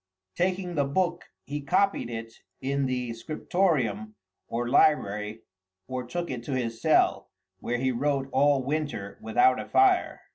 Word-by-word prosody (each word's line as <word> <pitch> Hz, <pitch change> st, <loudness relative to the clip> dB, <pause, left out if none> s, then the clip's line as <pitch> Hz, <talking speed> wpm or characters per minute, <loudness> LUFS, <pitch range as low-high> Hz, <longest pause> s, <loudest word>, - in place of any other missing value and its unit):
Taking 180 Hz, 0 st, -1 dB
the 145 Hz, -3 st, +2 dB
book, 175 Hz, +5 st, -1 dB, 0.2 s
he 145 Hz, +1 st, -4 dB
copied 195 Hz, +2 st, +1 dB
it 115 Hz, -1 st, -6 dB, 0.3 s
in 140 Hz, 0 st, -1 dB
the 125 Hz, -2 st, -2 dB
Scriptorium 115 Hz, -, -1 dB, 0.3 s
or 120 Hz, +1 st, -2 dB
library, 110 Hz, -6 st, +2 dB, 0.4 s
or 130 Hz, -1 st, -4 dB
took 175 Hz, +5 st, -3 dB
it 120 Hz, -2 st, -5 dB
to 140 Hz, -, -3 dB
his 115 Hz, -3 st, -3 dB
cell, 150 Hz, -10 st, +3 dB, 0.3 s
where 120 Hz, -, -2 dB
he 130 Hz, +1 st, 0 dB
wrote 135 Hz, +2 st, 0 dB
all 140 Hz, 0 st, +3 dB
winter 140 Hz, -9 st, -3 dB
without 110 Hz, +3 st, +3 dB
a -, -, -7 dB
fire. 385 Hz, -2 st, +3 dB
130 Hz, 145 wpm, -27 LUFS, 115-155 Hz, 0.4 s, cell